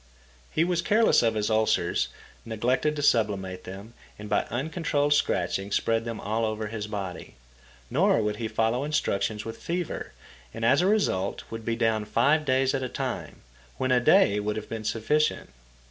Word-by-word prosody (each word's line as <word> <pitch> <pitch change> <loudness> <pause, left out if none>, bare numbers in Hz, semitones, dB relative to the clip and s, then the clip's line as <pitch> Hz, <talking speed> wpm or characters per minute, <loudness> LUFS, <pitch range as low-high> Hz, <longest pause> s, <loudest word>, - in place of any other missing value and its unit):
He 155 - +1
was 175 -1 +1
careless 220 +4 +4
of 115 -1 +1
his 105 +1 0
ulcers, 110 0 +2 0.4
neglected 125 +7 0
to 145 - -3
sublimate 100 -8 +1
them, 100 +5 -9 0.2
and 105 - -8
by 105 - +2
uncontrolled 145 +2 0
scratching 95 -6 0
spread 115 +2 +1
them 115 -2 -4
all 110 +3 -1
over 110 0 -2
his 105 0 -5
body. 100 -5 -6 0.6
Nor - - +3
would 105 0 -1
he 115 - -3
follow 115 +4 0
instructions 110 -7 -1
with 115 0 -7
fever, 175 -1 -4 0.4
and, 115 - -2
as 135 +7 +5
a 180 - +2
result, 195 - 0
would 115 0 -6
be 115 - 0
down 110 -2 +1
five 145 +8 +2
days 130 0 +2
at 135 - -1
a 130 - -3
time, - - -5 0.4
when 130 - 0
a 125 - +5
day 105 -4 +4
would 105 0 -2
have 110 - -5
been 110 -1 -5
sufficient. 115 - 0
115 Hz, 175 wpm, -27 LUFS, 105-140 Hz, 0.6 s, as